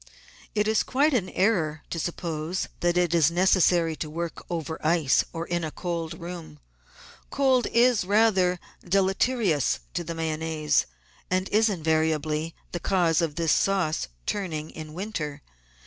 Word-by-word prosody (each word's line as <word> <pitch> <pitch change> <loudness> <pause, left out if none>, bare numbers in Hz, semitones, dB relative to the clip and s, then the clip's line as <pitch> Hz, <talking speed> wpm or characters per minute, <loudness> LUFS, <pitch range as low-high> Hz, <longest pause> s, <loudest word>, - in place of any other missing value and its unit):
It 210 0 +2
is 220 0 +3
quite 285 +4 +2
an 200 -8 0
error 165 -7 +1
to 165 - -2
suppose 165 +1 -3
that 175 0 +1
it 175 -1 +2
is 165 -3 +5
necessary 175 -2 +3
to 155 - -4
work 170 +2 -5
over 160 -2 -4
ice 155 -4 +3
or 165 0 -4
in 175 -1 -2
a 155 - -2
cold 165 0 -4
room. 170 - -8 0.7
Cold 260 -3 +2
is 240 -2 +3
rather 190 -3 +3 0.2
deleterious 195 - +1
to - - -2
the 170 0 -5
Mayonnaise, 160 -1 0 0.4
and 185 +1 0
is 220 +2 +3
invariably 160 -2 0 0.2
the 175 - -3
cause 175 -3 +2
of 160 -3 -1
this 165 -2 +1
sauce 180 - +1 0.2
turn 195 -4 -2
ing 155 0 -5
in 155 -1 -9
winter. 165 -8 -4
170 Hz, 150 wpm, -26 LUFS, 160-190 Hz, 0.7 s, is